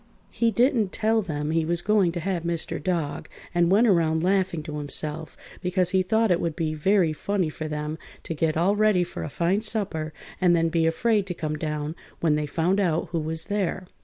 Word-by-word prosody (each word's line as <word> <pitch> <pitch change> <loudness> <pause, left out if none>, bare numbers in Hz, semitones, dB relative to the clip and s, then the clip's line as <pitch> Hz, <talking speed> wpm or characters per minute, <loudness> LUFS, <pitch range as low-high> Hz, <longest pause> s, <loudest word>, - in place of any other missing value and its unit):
He 230 - +2
didn't 235 -4 +2
tell 220 0 +1
them 150 -5 -3
he 165 0 +2
was 170 +2 0
going 205 -5 +3
to 175 - -3
have 185 0 -1
Mr. 170 -1 -3
Dog 170 -6 -2 0.2
and 175 -1 +3
went 205 +6 +5
around 165 -6 +3
laughing 185 -3 +1
to 150 -1 -6
himself, 150 +2 -4 0.2
because 180 0 +1
he 190 - +3
thought 220 +3 +2
it 175 - +2
would 165 -3 -2
be 160 -2 -1
very 170 +1 +2
funny 190 +1 -1
for 155 +1 -5
them 150 +1 -4 0.2
to - - -4
get 155 0 0
all 185 +5 +3
ready 210 -4 +3
for 175 - -7
a - - -4
fine 175 +7 0
supper 195 -8 -1 0.3
and 175 -1 +5
then 165 0 +2
be 165 -1 +2
afraid 205 +4 +1
to 180 - -4
come 155 -2 -3
down 150 0 -3 0.2
when 160 -3 +2
they 150 0 0
found 170 +6 +1
out 170 -4 0
who 170 - -1
was 160 +1 -3
there. 200 -3 -2
170 Hz, 210 wpm, -25 LUFS, 160-195 Hz, 0.3 s, went